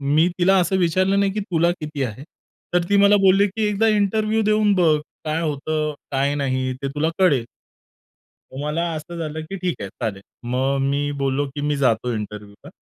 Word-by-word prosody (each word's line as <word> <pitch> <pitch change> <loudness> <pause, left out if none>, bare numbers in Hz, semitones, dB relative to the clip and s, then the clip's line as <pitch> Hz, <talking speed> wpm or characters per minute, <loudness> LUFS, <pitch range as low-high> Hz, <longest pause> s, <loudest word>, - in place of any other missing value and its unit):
मी 165 +3 +5
तिला 190 +2 +4
असं 190 +2 +1
विचारलं 185 +3 +2
नाही 200 -1 +2
की 210 - -2
तुला 170 -3 +1
किती 150 -3 -4
आहे? 125 +3 -5 0.5
तर 175 -1 +3
ती 200 - +4
मला 200 +1 +6
बोलली, 195 +1 +4
की 215 +3 -3
"एकदा 210 +2 +1
इंटरव्ह्यू 215 +1 +1
देऊन 215 -1 +3
बघ. 160 -4 +3 0.3
काय 155 +2 -1
होतं, 155 0 -2 0.2
काय 140 +1 +1
नाही, 130 -2 -1
ते 140 - -2
तुला 160 +2 +1
कळेल." 140 -11 +3 1.1
मग 135 - -7
मला 150 +3 -1
असं 170 +3 -7
झालं, 160 -1 -4
की 195 - -4
ठीक 180 - -3
आहे, 100 - -5
चालेल. 105 -4 -5 0.3
मग 135 +2 0
मी 145 +1 -1
बोललो, 135 +1 0
की 145 - -3
"मी 145 0 0
जातो 125 -2 +1
इंटरव्ह्यूला." 105 -1 -7
155 Hz, 185 wpm, -22 LUFS, 140-195 Hz, 1.1 s, मला